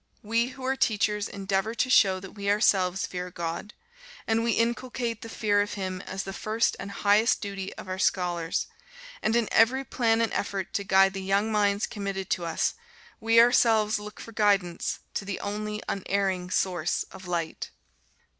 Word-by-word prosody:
We 230 +3 +1
who 260 0 -9
are 265 +1 +1
teachers 210 -4 +1
endeavor 195 +3 -2
to 235 - +1
show 190 -6 +5
that 195 - -9
we 200 -1 -4
ourselves 195 -3 +2
fear 180 0 -5
God, 170 +4 -5 0.5
and 225 0 +1
we 230 -1 +2
inculcate 235 -1 -1
the 230 - -8
fear 205 -2 +1
of 205 - -3
Him 185 -2 -4
as 195 +1 -4
the 195 - -6
first 220 +3 0
and 200 - -6
highest 205 +3 +3
duty 195 -2 -5
of - - -9
our 185 0 -4
scholars; 175 -4 0 0.6
and 220 - +1
in 235 -2 +2
every 250 +4 +4
plan 230 -4 +1
and 230 -2 0
effort 195 -2 -3
to 200 - -1
guide 195 -1 +4
the 195 - -4
young 200 +3 +1
minds 205 0 +2
committed 195 -3 -5
to 175 - 0
us, 165 - 0 0.5
we 225 +1 +4
ourselves 225 -2 +4
look 210 0 -9
for 230 - -9
guidance 200 -5 +1
to - - -2
the 195 -1 -4
only 210 +1 -4
unerring 190 -2 -1
source 180 -3 0
of 185 - -11
light. 170 -2 -3
205 Hz, 175 wpm, -27 LUFS, 190-225 Hz, 0.6 s, show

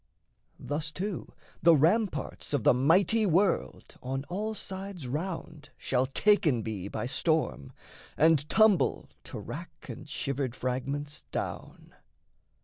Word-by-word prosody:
Thus, 150 +3 -3
too, 190 +2 -4 0.3
the 170 0 +7
ramparts 180 +3 +1
of 140 -6 +1
the - - +6
mighty 185 - +3
world 190 +4 0
On 135 +1 -3
all 215 +4 -2
sides 190 -5 -6
round 155 +1 -5
shall 130 0 0
taken 155 - +3
be 105 -4 -4
by 105 - -4
storm, 140 - 0 0.5
And 155 -2 +4
tumble 215 -9 +3
to - - -7
wrack - - -8
and - - -8
shivered 135 -3 -2
fragments 140 +4 -3
down. - - -5
155 Hz, 120 wpm, -29 LUFS, 135-190 Hz, 0.5 s, the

